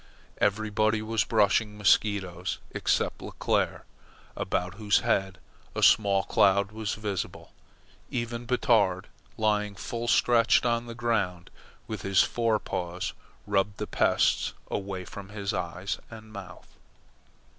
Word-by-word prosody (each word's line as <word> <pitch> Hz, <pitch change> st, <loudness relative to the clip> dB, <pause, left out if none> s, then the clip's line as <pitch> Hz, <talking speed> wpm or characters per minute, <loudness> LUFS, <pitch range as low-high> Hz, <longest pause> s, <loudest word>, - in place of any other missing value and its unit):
Everybody 110 Hz, +1 st, +1 dB
was 110 Hz, -1 st, +1 dB
brushing 105 Hz, 0 st, +2 dB
mosquitoes, 95 Hz, -4 st, +1 dB
except -, -, 0 dB
Leclere, -, -, -1 dB, 0.5 s
about 90 Hz, +2 st, -2 dB
whose 105 Hz, 0 st, +2 dB
head 95 Hz, -1 st, 0 dB, 0.4 s
a -, -, -1 dB
small 100 Hz, -2 st, +5 dB
cloud 100 Hz, +1 st, +3 dB
was 110 Hz, -1 st, -3 dB
visible. 105 Hz, -3 st, -5 dB, 0.6 s
Even 120 Hz, 0 st, -3 dB
Batard, 105 Hz, -7 st, +2 dB, 0.3 s
lying 105 Hz, -1 st, +1 dB
full 115 Hz, +4 st, -4 dB
stretched 120 Hz, 0 st, +4 dB
on 120 Hz, 0 st, 0 dB
the 115 Hz, -, -7 dB
ground 100 Hz, -7 st, -1 dB, 0.3 s
with 110 Hz, -2 st, -5 dB
his 100 Hz, -1 st, +4 dB
fore 115 Hz, -2 st, +1 dB
paws 90 Hz, -3 st, -4 dB, 0.3 s
rubbed 100 Hz, -1 st, 0 dB
the -, -, -3 dB
pests -, -, +2 dB, 0.2 s
away 95 Hz, -2 st, -3 dB
from 100 Hz, +2 st, -9 dB, 0.2 s
eyes 90 Hz, +3 st, -3 dB
and 110 Hz, -1 st, -12 dB
mouth. 90 Hz, -3 st, -11 dB
105 Hz, 115 wpm, -28 LUFS, 95-110 Hz, 0.6 s, small